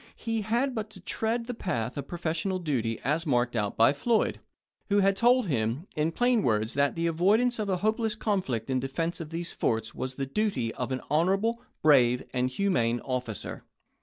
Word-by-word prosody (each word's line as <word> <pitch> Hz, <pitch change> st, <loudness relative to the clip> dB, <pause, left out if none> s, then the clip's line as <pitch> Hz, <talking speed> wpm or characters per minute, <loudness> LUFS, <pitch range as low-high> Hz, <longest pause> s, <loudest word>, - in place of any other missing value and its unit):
He 225 Hz, -1 st, -2 dB
had 240 Hz, +6 st, 0 dB
but 220 Hz, -2 st, -4 dB
to -, -, -13 dB
tread 230 Hz, +1 st, -2 dB
the 245 Hz, -, -4 dB
path 125 Hz, -, -3 dB
of 140 Hz, -, -5 dB
professional 175 Hz, +2 st, -2 dB
duty 125 Hz, -10 st, -1 dB
as 155 Hz, +5 st, 0 dB
marked 120 Hz, -2 st, +1 dB
out 105 Hz, -3 st, -1 dB
by 115 Hz, +5 st, +6 dB
Floyd, 220 Hz, +10 st, +1 dB, 0.5 s
who 205 Hz, 0 st, +4 dB
had 195 Hz, 0 st, +3 dB
told 245 Hz, +3 st, +4 dB
him 125 Hz, -, -1 dB
in 155 Hz, +2 st, +1 dB
plain 245 Hz, +4 st, +2 dB
words 110 Hz, -, +1 dB
that 140 Hz, 0 st, +1 dB
the 165 Hz, 0 st, -1 dB
avoidance 210 Hz, +9 st, +2 dB
of 210 Hz, -2 st, -1 dB
a 185 Hz, -, +1 dB
hopeless 220 Hz, 0 st, +1 dB
conflict 180 Hz, -, -1 dB
in 130 Hz, -, +2 dB
defense 165 Hz, +7 st, -2 dB
of 160 Hz, -3 st, -6 dB
these 170 Hz, +1 st, -4 dB
forts 110 Hz, -1 st, -1 dB
was 130 Hz, 0 st, -4 dB
the 135 Hz, -, -2 dB
duty 135 Hz, -, -1 dB
of 125 Hz, +1 st, -4 dB
an 130 Hz, -, -2 dB
honorable, 195 Hz, +9 st, +2 dB, 0.2 s
brave, 125 Hz, -5 st, +5 dB
and 125 Hz, 0 st, +1 dB
humane 125 Hz, -7 st, +1 dB
officer. 125 Hz, -5 st, -4 dB
165 Hz, 190 wpm, -28 LUFS, 125-210 Hz, 0.5 s, by